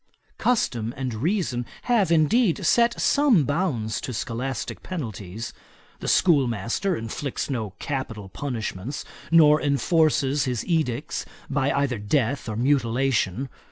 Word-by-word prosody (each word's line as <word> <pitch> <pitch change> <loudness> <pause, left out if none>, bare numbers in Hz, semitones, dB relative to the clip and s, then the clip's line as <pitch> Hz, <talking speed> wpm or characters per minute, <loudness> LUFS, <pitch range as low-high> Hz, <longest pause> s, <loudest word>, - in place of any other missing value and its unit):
Custom 120 - 0
and 130 -2 -3
reason 140 - -1 0.2
have, 215 -8 +2
indeed, 175 +4 +3
set 235 +6 +3
some 280 - +4
bounds 140 - -1
to 125 - -5
scholastick 120 +3 -4
penalties. 110 - -6 0.5
The - - -6
schoolmaster 135 - +2
inflicts 120 +6 -4
no 110 -7 -3
capital 120 -8 -4
punishments; 120 +1 -4 0.2
nor 155 -2 +6
enforces 145 -1 +2
his 125 -3 -2
edicts 155 -5 -1 0.3
by 140 0 +1
either 140 -5 0
death 120 +4 0
or 110 - -3
mutilation. 125 -2 +1
135 Hz, 115 wpm, -25 LUFS, 115-160 Hz, 0.5 s, nor